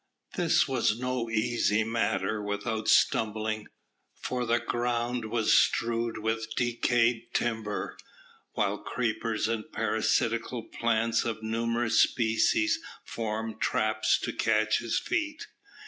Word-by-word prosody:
This - - +3
was 105 - +1
no 125 -1 -2
easy 115 -1 +1
matter 110 -1 -1
without 105 +2 -3
stumbling, 110 0 +2 0.5
for 125 -1 -3
the 120 +1 +3
ground 120 0 -1
was 110 0 +1
strewed 115 0 +2
with 110 +1 -2
decayed 120 -1 +1
timber, 110 -3 -2 0.5
while 105 0 0
creepers 115 -2 -2
and 110 -1 -3
parasitical - - 0
plants 115 0 0
of 110 -1 -4
numerous 115 +1 +1
species 315 - +2 0.3
formed 110 0 -4
traps 110 0 +2
to - - -3
catch 110 -1 +2
his 115 - -1
feet. 310 0 -2
115 Hz, 110 wpm, -28 LUFS, 110-120 Hz, 0.5 s, This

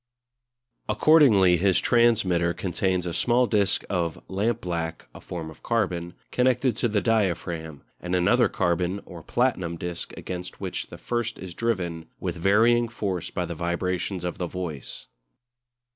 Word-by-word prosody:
Accordingly 105 - +5
his 95 +1 +3
transmitter 100 -8 +3
contains 90 0 -1
a 85 - -3
small 125 +5 +3
disc 105 -4 +1
of 85 -4 -1
lampblack 90 -6 -2
(a - - -11
form 80 -2 -6
of - - -16
carbon) 90 -7 -1 0.2
connected 125 -1 +2
to - - +1
the 105 -2 0
diaphragm, 85 - -1 0.2
and 90 +1 -2
another 120 +8 +4
carbon 90 +2 0
or 85 -3 -10
platinum 95 -5 0
disc 85 0 -5
against 90 0 -6
which - - -4
the - - -10
first 120 -1 -2
is 95 -2 -8
driven 90 -7 -2
with 90 -2 -3
varying 115 +7 +4
force 95 -6 -3
by 90 - -2
the 85 - -5
vibrations 90 +2 -2
of 90 - -4
the 90 - -1
voice. 80 -9 -6
90 Hz, 145 wpm, -26 LUFS, 85-115 Hz, 0.2 s, Accordingly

